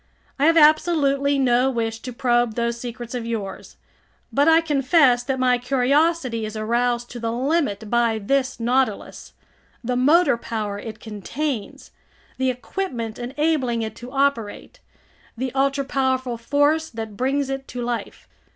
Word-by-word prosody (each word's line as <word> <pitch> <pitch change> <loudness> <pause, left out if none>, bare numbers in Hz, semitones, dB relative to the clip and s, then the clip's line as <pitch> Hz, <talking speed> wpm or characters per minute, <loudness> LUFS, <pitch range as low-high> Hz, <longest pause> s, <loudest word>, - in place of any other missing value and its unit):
I 290 - +4
have 330 0 +4
absolutely 295 -3 +4
no 255 -1 +3
wish 225 -3 -2
to 250 - -7
probe 240 -2 +1
those 235 0 -1
secrets 240 0 -7
of 245 -2 -3
yours! 210 -5 -5 0.6
But 285 +2 +3
I 325 0 +7
confess 280 -4 +3
that 265 +2 -2
my 250 -1 +2
curiosity 265 0 +1
is 215 0 -5
aroused 240 +2 0
to 245 - -7
the 230 0 -2
limit 250 -4 -1
by 235 0 +1
this 260 +4 -1
Nautilus, 250 +3 -1 0.5
the 250 +1 -1
motor 290 +3 +4
power 215 -3 -4
it 220 0 -8
contains, 225 +3 -5 0.5
the 260 0 +2
equipment 250 - -4
enabling 255 -2 0
it 220 - -5
to 240 +1 -9
operate, 275 - -1 0.6
the 255 +1 -3
ultra 275 +1 +1
powerful 260 -2 0
force 290 +6 +1
that 220 -2 -7
brings 270 +3 0
it 270 0 -5
to 245 -1 -5
life. 240 -1 -5
250 Hz, 145 wpm, -22 LUFS, 235-280 Hz, 0.6 s, I